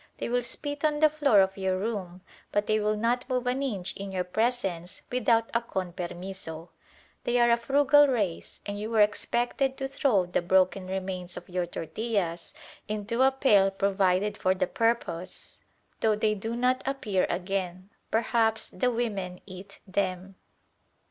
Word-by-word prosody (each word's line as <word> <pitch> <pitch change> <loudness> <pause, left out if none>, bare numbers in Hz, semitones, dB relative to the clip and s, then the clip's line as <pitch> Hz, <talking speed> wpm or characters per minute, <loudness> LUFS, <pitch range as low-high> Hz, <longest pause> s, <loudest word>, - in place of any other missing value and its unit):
They - - -3
will 245 +1 +1
spit 290 +4 -4
on 300 -1 +2
the 310 -1 +5
floor 280 -9 +4
of 190 0 +1
your 190 -1 0
room; 190 -4 -4 0.3
but 205 0 +1
they 215 +1 +2
will 210 0 0
not 240 +4 0
move 250 -1 0
an 250 +2 0
inch 200 -9 -2
in 195 0 -6
your 185 -1 -1
presence 185 -3 -2
without 230 -2 +2
a 235 - +2
"con 190 -6 -4
permiso." 175 -2 -6 0.5
They 240 - +1
are 240 0 +5
a 235 - +5
frugal 285 +4 +5
race, 210 -10 -2
and 205 0 -4
you 215 +1 -4
were 225 -2 +3
expected 240 +5 +1
to 270 - -2
throw 260 -8 +2
the 175 - -1
broken 185 +1 +2
remains 185 -1 -4
of - - -9
your 180 -1 -1
tortillas 175 -1 -3 0.3
into 215 +3 -2
a 265 +1 +6
pail 215 -8 +4
provided 195 +1 +1
for 185 0 +2
the 185 0 +1
purpose, 185 -5 -2 0.4
though 220 -1 +3
they 215 0 +1
do 225 +3 -4
not 250 +1 +1
appear 215 -9 0
again. 185 +1 -3 0.2
Perhaps 225 -1 +1
the 250 - +1
women 205 -7 -3
eat 185 0 -11
them. 190 -1 -2
205 Hz, 165 wpm, -28 LUFS, 185-240 Hz, 0.5 s, a